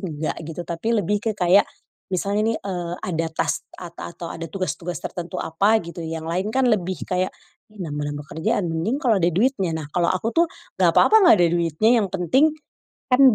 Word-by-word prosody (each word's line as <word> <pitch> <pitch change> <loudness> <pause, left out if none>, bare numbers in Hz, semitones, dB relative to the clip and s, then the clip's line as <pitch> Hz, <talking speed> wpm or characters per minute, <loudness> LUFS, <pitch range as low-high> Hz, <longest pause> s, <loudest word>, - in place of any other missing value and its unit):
enggak 155 -2 -3
gitu 165 +2 -5
tapi 195 +8 -1
lebih 205 +1 +1
ke 220 0 0
kayak, 180 +2 +5 0.5
misalnya 200 +3 0
nih, - - -3
eee, 175 -3 -4
ada 165 -2 -1
task - - -1
ata 175 -1 -9
atau 170 - -7
ada 165 0 -5
tugas-tugas 180 -1 -3
tertentu 175 +1 -5
apa 200 +7 +2
gitu 170 0 -8
yang 160 0 -5
lain 185 +5 -1
kan 265 -1 +3
lebih 185 -6 0
kayak, 185 0 0 0.4
"Ih, 210 - -18
nambah-nambah 145 -1 -4
kerjaan 170 +4 0
mending 195 - -1
kalau 225 -6 +3
ada 170 - +3
duitnya" 195 - +1
nah 150 - -6
kalau 175 -1 +2
aku 185 +4 0
tuh 335 +1 +4 0.3
gak - - +6
papa 440 0 +6
gak 225 - +7
ada - - +5
duitnya 175 +8 +3
yang 195 - -2
penting, 195 - +3 0.6
kan 250 +2 +5
180 Hz, 190 wpm, -23 LUFS, 165-210 Hz, 0.6 s, gak